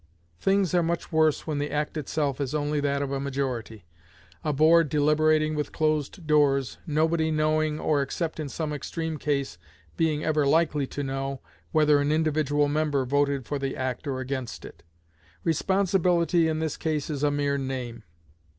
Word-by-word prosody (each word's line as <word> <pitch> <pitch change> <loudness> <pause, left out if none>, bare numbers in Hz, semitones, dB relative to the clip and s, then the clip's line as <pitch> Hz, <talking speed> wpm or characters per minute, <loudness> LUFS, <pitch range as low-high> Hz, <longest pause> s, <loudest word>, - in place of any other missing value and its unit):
Things 195 -2 +2
are 175 - +4
much 170 +1 -2
worse 155 -2 +2
when 150 -2 -2
the 145 +1 -2
act 150 +1 -2
itself 145 -2 -2
is 140 +1 -2
only 150 0 0
that 140 0 0
of 140 - -4
a 140 - -1
majority 130 -7 -4 0.6
a 150 - 0
board 160 +2 +4
deliberating 155 +1 +3
with 150 -1 -2
closed 155 +2 -1
doors, 140 -4 +2
nobody 160 +1 +1
knowing, 155 0 +1
or, 145 -2 +1
except 160 +4 -3
in 150 -2 -3
some 155 +1 -3
extreme 160 +1 -4
case, 140 - -2 0.4
being 155 -2 +1
ever 150 -2 +1
likely 150 -2 +2
to 145 - -5
know, 135 0 -3 0.3
whether 150 -2 +4
an 145 +1 +1
individual 155 -2 +1
member 145 -2 0
voted 140 0 +1
for 145 +3 -3
the 135 -1 -3
act 130 +2 -3
or 130 -2 -2
against 130 -4 -5
it. - - -12 0.6
Responsibility 175 -1 +2
in 160 -1 0
this 160 -2 -2
case 155 -3 -2
is 145 -2 -3
a 145 - +3
mere 145 -1 0
name. 125 -4 -4
150 Hz, 170 wpm, -26 LUFS, 140-155 Hz, 0.6 s, are